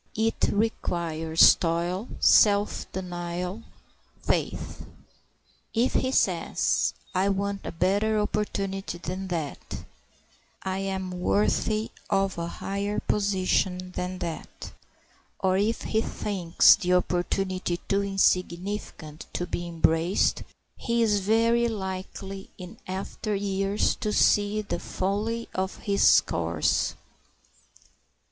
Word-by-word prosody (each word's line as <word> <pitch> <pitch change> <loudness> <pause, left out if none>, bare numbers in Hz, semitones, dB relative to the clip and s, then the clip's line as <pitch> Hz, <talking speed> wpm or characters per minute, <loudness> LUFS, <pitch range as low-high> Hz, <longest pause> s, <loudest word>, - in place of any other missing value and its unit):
It 225 +1 +1
requires 170 -7 +3
toil, 175 +5 -1
self 205 -1 +4
denial, 180 +2 -4 0.6
faith. - - -2 0.9
If 235 +3 +2
he 260 - +1
says, - - +1 0.2
"I 190 +2 +2
want 200 0 -2
a - - -3
better 205 +5 +1
opportunity 195 -3 -2
than 185 +3 -5
that; 165 -5 -5 0.8
I 190 0 -2
am 190 -1 -3
worthy 210 +4 0 0.2
of 195 -2 +1
a 170 - -2
higher 200 +4 -3
position 185 -2 0
than 180 0 -4
that," 170 -3 -6 0.7
or 185 -1 +2
if 215 +4 0
he 220 - +1
thinks 185 -6 +4
the 180 0 0
opportunity 180 0 0
too 200 0 +2
insignificant 185 -4 -1
to 175 - -2
be 175 0 -4
embraced, 165 +2 +2 0.4
he 235 -1 +1
is 210 -2 +3
very 230 +4 +3
likely 195 -1 -5
in 180 -1 -10
after 195 +3 -3
years 195 +1 0
to 210 - -2
see 210 0 +3
the 175 -4 -3
folly 210 +6 -2
of 190 0 -2
his 200 -1 +5
course. - - 0
195 Hz, 105 wpm, -26 LUFS, 180-205 Hz, 0.9 s, his